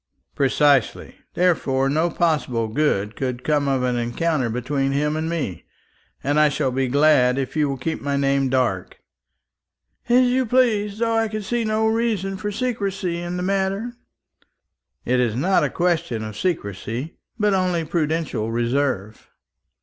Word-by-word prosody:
"Precisely. 140 -1 +2 0.2
Therefore 140 -7 +2
no 155 +5 +1
possible 150 -9 0
good 110 -5 0
could 125 -2 -3
come 145 0 +1
of 135 -2 +1
an 125 -1 0
encounter 125 +3 0
between 135 +4 -1
him 150 +2 0
and 160 +1 -2
me, 140 - -3 0.6
and 145 +2 +1
I 150 0 +5
shall 140 -2 -1
be 130 +1 0
glad 135 -2 +4
if 135 +1 -3
you 150 -2 +2
will 135 - -3
keep 160 +5 -3
my 140 0 -1
name 140 -1 +1
dark." 125 -8 -1 1.1
"As 250 +1 +5
you 250 0 +1
please, 215 -4 +2
though 230 0 0
I 225 0 +2
can 215 0 -5
see 240 +3 -1
no 215 0 0
reason 220 -4 0
for 210 +2 -4
secrecy 195 -7 -2
in 175 +1 -4
the 180 - -3
matter." 195 +4 -1 1.1
"It 125 +1 +2
is 120 -3 +1
not 180 +9 +2
a - - +1
question 170 -10 -1
of 110 -1 -6
secrecy, 120 - -3 0.2
but 210 -2 +2
only 180 -3 +1
of 160 - -9
prudential 160 -8 -1
reserve." 120 -3 -1
150 Hz, 155 wpm, -22 LUFS, 130-190 Hz, 1.1 s, I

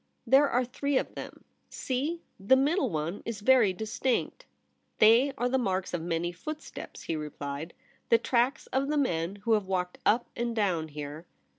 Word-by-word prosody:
' - - -47
There 270 +4 +5
are 250 0 +1
three 280 +3 -1
of - - -2
them. - - -9 0.3
See! 290 +6 -3 0.2
the 200 +7 +5
middle 275 +1 +2
one 160 +2 -3
is 225 -3 -5
very 240 -3 +5
distinct.' 240 - -2 0.3
' - - -46
They 230 +6 +6
are 245 - +1
the 260 +1 +1
marks 190 -6 -1
of 175 - -1
many 170 +1 -1
footsteps,' 305 - -8
he 165 - -2
replied; 150 +1 -6 0.2
' - - -36
the 230 - +7
tracks 245 +3 +1
of 270 +1 +1
the 300 +1 0
men 175 - 0
who 230 - +2
have 210 -3 +1
walked 180 -1 -2
up 235 +3 +3
and 235 -1 -2
down 180 -7 0
here.' 150 +2 -8
225 Hz, 185 wpm, -29 LUFS, 175-260 Hz, 0.3 s, the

